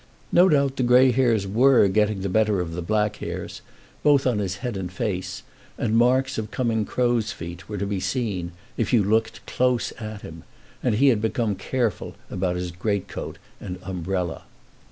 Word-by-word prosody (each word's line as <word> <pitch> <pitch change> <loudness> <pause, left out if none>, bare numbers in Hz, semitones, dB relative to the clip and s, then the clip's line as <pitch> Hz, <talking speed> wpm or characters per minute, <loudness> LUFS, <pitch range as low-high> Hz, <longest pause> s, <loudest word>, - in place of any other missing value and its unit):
No 180 +2 +6
doubt 140 -2 +2
the - - 0
grey 125 +1 +6
hairs 115 -5 +2
were 120 +3 +5
getting 105 0 +1
the 100 - -2
better 105 0 +2
of 85 -2 -3
the 90 - -4
black 105 +3 0
hairs, - - -6 0.4
both 145 -2 +4
on 120 -5 +2
his 95 -2 -2
head 120 -3 -2
and 90 -2 -4
face, 95 0 -3 0.3
and 115 -4 0
marks 130 +2 +3
of 110 -1 -4
coming 115 -4 0
crows' 120 -2 0
feet 85 -4 -8
were 105 - -4
to 100 - -2
be 100 -1 -2
seen 95 -7 -2 0.3
if 115 +1 -1
you 115 -4 +5
looked 110 +3 0
close 125 -1 +1
at 110 -2 -7
him, 80 0 -9 0.4
and 120 -4 +1
he 135 +5 +5
had 115 -5 +2
become 110 -1 0
careful 115 +4 -2 0.2
about 90 -1 -1
his 90 0 -3
great 100 +3 -2
coat - - -6 0.2
and 90 - -6
umbrella. 90 -1 -3
105 Hz, 185 wpm, -24 LUFS, 95-120 Hz, 0.4 s, No